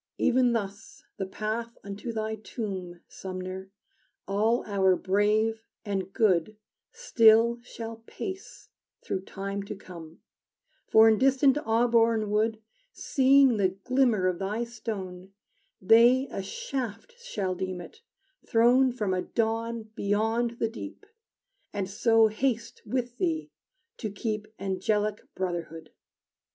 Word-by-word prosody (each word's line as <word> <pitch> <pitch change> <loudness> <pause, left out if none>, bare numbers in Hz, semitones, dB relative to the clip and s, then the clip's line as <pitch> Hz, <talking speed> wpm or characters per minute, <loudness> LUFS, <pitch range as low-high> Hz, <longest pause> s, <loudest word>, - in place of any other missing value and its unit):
Ev'n 250 -1 +3
thus 200 -1 -5
the 195 - -3
path 220 +4 -4
unto 200 +4 -6
thy 220 -1 -2
tomb, 190 -5 -6
Sumner, 185 0 -7 0.6
all 215 +5 +1
our 190 -2 +3
brave 215 +4 +1 0.2
and 195 -2 -3
good 205 -1 +2 0.3
Still 235 - +4
shall 230 -1 -8
pace 395 +6 -7 0.3
through 190 - -3
time 200 +1 -4
to 200 +1 -6
come, 170 -4 -12 0.7
For 220 0 +7
in 220 -1 +4
distant 270 0 +4
Auburn 225 -2 +3
wood 215 +1 +1 0.3
Seeing 270 - +4
the 195 -2 +3
glimmer 250 -7 +2
of 185 -2 0
thy 205 +4 -2
stone, 200 -6 -7 0.5
They 240 +7 +5
a - - -3
shaft 250 - -5
shall 195 - -2
deem 185 0 -4
it, 440 - -12 0.5
thrown 245 +3 +4
From 210 -6 -2
a 185 - 0
dawn 230 +1 -2
beyond 225 +4 0
the 225 - 0
deep, 295 - -9 0.7
And 200 -2 -2
so 225 +3 +4
haste 230 +1 -1
with 245 -1 -3
thee 325 -3 -1 0.5
to 220 - -4
keep 215 +1 -4
Angelic 205 +2 -1
brotherhood! 170 -3 -4
220 Hz, 120 wpm, -28 LUFS, 195-235 Hz, 0.7 s, For